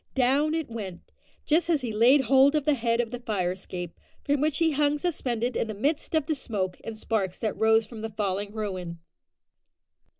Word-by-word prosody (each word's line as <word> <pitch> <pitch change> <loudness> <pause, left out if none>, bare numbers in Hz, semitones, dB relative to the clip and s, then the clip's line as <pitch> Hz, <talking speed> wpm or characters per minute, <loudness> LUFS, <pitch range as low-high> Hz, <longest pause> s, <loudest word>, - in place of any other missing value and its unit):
Down 280 +4 +2
it 320 -3 -2
went, 205 -6 -8 0.3
just 330 +3 +2
as 315 -4 +2
he 240 -3 -3
laid 240 +6 +5
hold 270 +2 +5
of 300 -2 0
the 300 - +4
head 230 -2 0
of 235 -2 -1
the 245 - -5
fire 200 -7 -1
escape, 180 -2 -7 0.2
from 285 -1 +1
which 305 -1 +1
he 330 -2 +3
hung 295 0 +2
suspended 250 -7 -2
in - - 0
the 215 - -5
midst 290 +9 -1
of 315 -3 +2
the 315 - 0
smoke 200 -10 -3
and 225 -1 -6
sparks 205 -4 -1
that 220 - -1
rose 220 0 +3
from 225 -3 -10
the 225 - -4
falling 205 -1 -2
ruin. 185 -6 -4
235 Hz, 200 wpm, -27 LUFS, 210-285 Hz, 0.3 s, laid